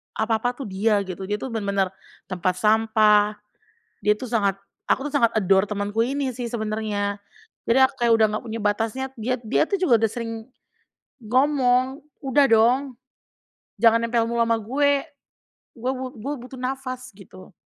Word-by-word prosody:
apa-apa 225 Hz, +2 st, 0 dB
tuh 260 Hz, -3 st, -7 dB
dia, 205 Hz, +2 st, +1 dB
gitu. 185 Hz, +1 st, -6 dB
Dia 205 Hz, -, -1 dB
tuh 265 Hz, -, -5 dB
benar 220 Hz, -3 st, -3 dB
benar 195 Hz, -1 st, +1 dB, 0.4 s
tempat 185 Hz, -1 st, -1 dB
sampah, 215 Hz, -1 st, +3 dB, 0.7 s
dia 210 Hz, -, +5 dB
tuh 250 Hz, +3 st, -7 dB
sangat 200 Hz, -5 st, +1 dB, 0.3 s
aku 270 Hz, -, +1 dB
tuh -, -, -11 dB
sangat 230 Hz, -5 st, +4 dB
adore 190 Hz, -1 st, +3 dB
temanku 205 Hz, +2 st, -1 dB
ini 270 Hz, +1 st, -2 dB
sih 245 Hz, 0 st, -4 dB
sebenarnya. 215 Hz, -2 st, -2 dB, 0.5 s
Jadi 235 Hz, +3 st, +4 dB
ak 260 Hz, -, +4 dB
kayak 235 Hz, -, +4 dB
udah 220 Hz, -, +4 dB
nggak 230 Hz, -, -6 dB
punya 230 Hz, -, -4 dB
batasnya. 225 Hz, +5 st, -1 dB
Diat 245 Hz, +3 st, -2 dB
dia 220 Hz, -, +2 dB
tuh 400 Hz, -, 0 dB
juga 340 Hz, -10 st, +4 dB
udah 220 Hz, -, +2 dB
sering, 230 Hz, -1 st, -5 dB, 0.9 s
ngomong, 260 Hz, +2 st, +2 dB, 0.2 s
"Udah 275 Hz, +1 st, +3 dB
dong, 245 Hz, +4 st, +3 dB, 0.8 s
jangan 230 Hz, -1 st, +6 dB
nempel 230 Hz, 0 st, +1 dB
mulu 235 Hz, 0 st, +1 dB
sama 230 Hz, 0 st, +2 dB
gue. 280 Hz, +5 st, +1 dB, 0.8 s
Gue 250 Hz, +3 st, -1 dB
bu 260 Hz, 0 st, -5 dB
gue 270 Hz, +7 st, -4 dB
butuh 260 Hz, +1 st, -10 dB
nafas." 255 Hz, 0 st, -5 dB
gitu. 185 Hz, -1 st, -14 dB
230 Hz, 165 wpm, -23 LUFS, 210-255 Hz, 0.9 s, jangan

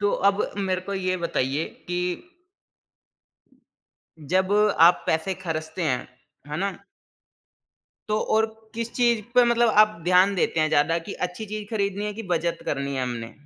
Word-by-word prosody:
तो 205 Hz, 0 st, +1 dB, 0.2 s
अब 200 Hz, +1 st, +1 dB, 0.2 s
मेरे 190 Hz, -2 st, 0 dB
को 200 Hz, -, -2 dB
ये 185 Hz, -1 st, -1 dB
बताइए 140 Hz, -1 st, -1 dB, 0.3 s
कि 175 Hz, 0 st, 0 dB, 2.2 s
जब 185 Hz, +6 st, 0 dB, 0.3 s
आप 175 Hz, +2 st, +6 dB
पैसे 160 Hz, +4 st, 0 dB
खर्चते 160 Hz, -1 st, -5 dB
हैं, 130 Hz, -6 st, -1 dB, 0.4 s
है 150 Hz, -, -4 dB
ना 195 Hz, +4 st, 0 dB, 1.4 s
तो 215 Hz, 0 st, +1 dB, 0.2 s
और 220 Hz, 0 st, +3 dB, 0.3 s
किस 230 Hz, 0 st, -4 dB
चीज़ 235 Hz, -3 st, +2 dB
पे 250 Hz, -1 st, +7 dB
मतलब 235 Hz, 0 st, +3 dB
आप 215 Hz, -4 st, -1 dB
ध्यान 185 Hz, +3 st, +4 dB
देते 170 Hz, -3 st, +1 dB
हैं 155 Hz, -, +2 dB
ज़्यादा, 155 Hz, +3 st, +2 dB
कि 170 Hz, +4 st, -8 dB
अच्छी 180 Hz, +5 st, -4 dB
चीज़ 210 Hz, 0 st, -5 dB
खरीदनी 200 Hz, -2 st, -1 dB
है 210 Hz, -, -2 dB
कि 225 Hz, -, -6 dB
बचत 170 Hz, 0 st, -1 dB
करनी 140 Hz, 0 st, -2 dB
है 130 Hz, -, -1 dB
हमने? 120 Hz, -2 st, -4 dB
185 Hz, 155 wpm, -24 LUFS, 160-210 Hz, 2.2 s, पे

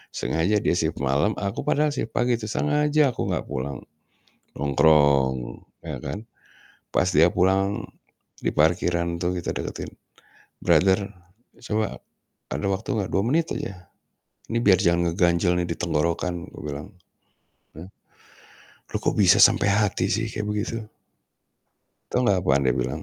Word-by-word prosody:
Sengaja 95 Hz, +6 st, 0 dB
dia -, -, +2 dB
shift 80 Hz, 0 st, -1 dB
malam, 70 Hz, +11 st, +1 dB
aku 100 Hz, +1 st, -4 dB
padahal 150 Hz, 0 st, +2 dB
shift 115 Hz, -5 st, -5 dB
pagi 120 Hz, -1 st, +1 dB
tuh, 110 Hz, -, -6 dB
sengaja 150 Hz, +2 st, +2 dB
aku -, -, -4 dB
gak -, -, -1 dB
pulang. 65 Hz, +2 st, -4 dB, 0.7 s
Nongkrong, 70 Hz, -4 st, +2 dB, 0.2 s
ya -, -, -5 dB
kan. 90 Hz, +12 st, -6 dB, 0.7 s
Pas 90 Hz, -, +2 dB
dia 85 Hz, +1 st, +4 dB
pulang, 95 Hz, +2 st, +1 dB, 0.6 s
di -, -, -2 dB
parkiran 85 Hz, +2 st, +1 dB
tuh 90 Hz, +1 st, -1 dB
kita -, -, -4 dB
deketin. -, -, -5 dB, 0.7 s
"Brother, 95 Hz, +1 st, +3 dB, 0.6 s
coba 110 Hz, -1 st, -2 dB, 0.6 s
ada 75 Hz, +7 st, -3 dB
waktu 95 Hz, +3 st, -2 dB
gak? 95 Hz, -, -3 dB
2 95 Hz, -, +2 dB
menit 160 Hz, +6 st, +1 dB
aja. 90 Hz, -3 st, -7 dB, 0.6 s
Ini 115 Hz, -, +1 dB
biar 100 Hz, -5 st, +5 dB
jangan 85 Hz, -1 st, +2 dB
ngeganjel 90 Hz, 0 st, +2 dB
nih 90 Hz, -, 0 dB
di -, -, -6 dB
tenggorokan," 85 Hz, +1 st, -1 dB
gue -, -, -11 dB
bilang, 75 Hz, +4 st, -6 dB, 0.9 s
hah. 90 Hz, +4 st, -9 dB, 1.0 s
"Lu -, -, +1 dB
kok -, -, +1 dB
bisa -, -, +6 dB
sampai -, -, +4 dB
hati 100 Hz, -2 st, +1 dB
sih, 110 Hz, +2 st, 0 dB
kayak 105 Hz, 0 st, -4 dB
begitu?" 105 Hz, +2 st, -2 dB, 1.3 s
Tahu 125 Hz, -, +1 dB
gak 95 Hz, -2 st, +3 dB
apaan 70 Hz, -6 st, +2 dB
dia 65 Hz, -, +3 dB
bilang? 65 Hz, +6 st, -3 dB
90 Hz, 145 wpm, -24 LUFS, 80-105 Hz, 1.3 s, bisa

